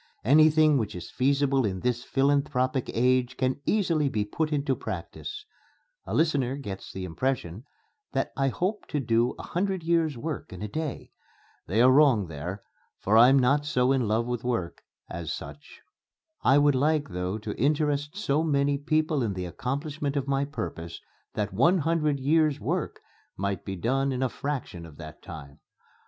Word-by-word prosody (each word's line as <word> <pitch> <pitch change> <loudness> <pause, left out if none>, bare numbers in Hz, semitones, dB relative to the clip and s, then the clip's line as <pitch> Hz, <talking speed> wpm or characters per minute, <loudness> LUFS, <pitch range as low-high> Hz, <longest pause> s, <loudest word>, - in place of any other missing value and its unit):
Anything 155 +2 +5
which 110 -5 -3
is 90 - -8
feasible 140 0 +2
in 95 -4 -2
this 120 -1 -1
philanthropic 135 -2 +1
age 125 +1 +1
can 130 +1 0
easily 165 -9 +2
be 105 -5 -1
put 155 +9 -2
into 140 -2 0
practice.... 115 - -6 0.6
A - - -2
listener 140 -5 +1
gets 100 -9 -7
the 95 -1 -5
impression 105 +1 -3 0.5
that 135 - -1
I 135 0 +1
hope 185 - -2
to 150 - -2
do 120 -1 +1
a - - -8
hundred 190 0 -2
years' 165 -4 +1
work 155 +2 -5
in 95 +2 -7
a - - -2
day. 155 +4 -5 0.6
They 110 +7 +3
are 130 - +7
wrong 130 - +4
there, 85 +6 -6 0.3
for 105 - +1
I'm 125 +4 +7
not 135 +3 +3
so 130 -3 +1
in 130 -4 +1
love 110 +3 +1
with 120 -1 -3
work 115 -9 -2 0.3
as 85 -2 -5
such. 75 0 -9 0.6
I 135 - +5
would 145 0 +5
like 150 +3 +1
though 90 +2 -3
to 110 -1 -5
interest 145 - 0
so 155 -8 +1
many 140 -2 +1
people 155 0 +1
in 110 -4 -1
the 90 -1 -4
accomplishment 140 - -3
of 140 -1 -2
my 140 0 +1
purpose 85 - -6 0.4
that 105 -2 -2
one 165 - +4
hundred 155 -3 +1
years' 150 +1 +2
work - - -3 0.4
might 100 0 -2
be 95 - -5
done 135 +8 0
in 130 0 -1
a 130 - +1
fraction 130 -11 -4
of 75 -2 -15
that - - -10
time. 75 -3 -10
135 Hz, 170 wpm, -27 LUFS, 110-150 Hz, 0.6 s, are